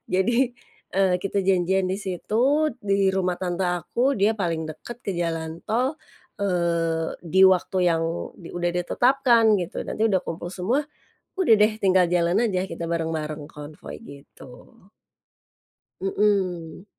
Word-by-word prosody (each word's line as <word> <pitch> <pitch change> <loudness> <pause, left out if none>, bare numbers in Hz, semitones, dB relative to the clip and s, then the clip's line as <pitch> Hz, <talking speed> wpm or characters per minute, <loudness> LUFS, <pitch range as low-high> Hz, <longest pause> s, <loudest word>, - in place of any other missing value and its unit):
Jadi, 240 +7 +2 0.4
eee, 190 -1 +3
kita 195 +2 -2
janjian 190 0 +1
di 190 - -1
situ, 230 - +1 0.2
di 195 -1 +2
rumah 185 -2 -1
tante 180 0 -1
aku, 180 +10 0
dia 215 -1 +1
paling 165 -5 -2
dekat 235 +10 -9
ke 195 -6 -4
jalan 165 -1 -3
tol. 255 +7 0 0.4
Eee, 170 -4 0
di 190 +3 +5
waktu 185 0 +1
yang 165 -1 +1 0.3
di 170 - -11
udah 175 0 -1
di 180 - +1
eee, - - -26
tetapkan, 240 -4 +4
gitu. 180 -2 -4
Nanti 220 - -1
udah 195 -4 +2
kumpul 175 0 -6
semua, 230 +11 0 0.6
udah 230 -12 +6
deh. 215 +1 +5
Tinggal 185 -2 +4
jalan 175 +6 +2
aja 190 -4 -1
kita 170 0 -6
bareng-bareng, 160 -3 -3
konvoi, 150 0 -10
gitu. 140 - -14 1.3
Mmm. 190 -3 -1
185 Hz, 140 wpm, -24 LUFS, 170-210 Hz, 1.3 s, udah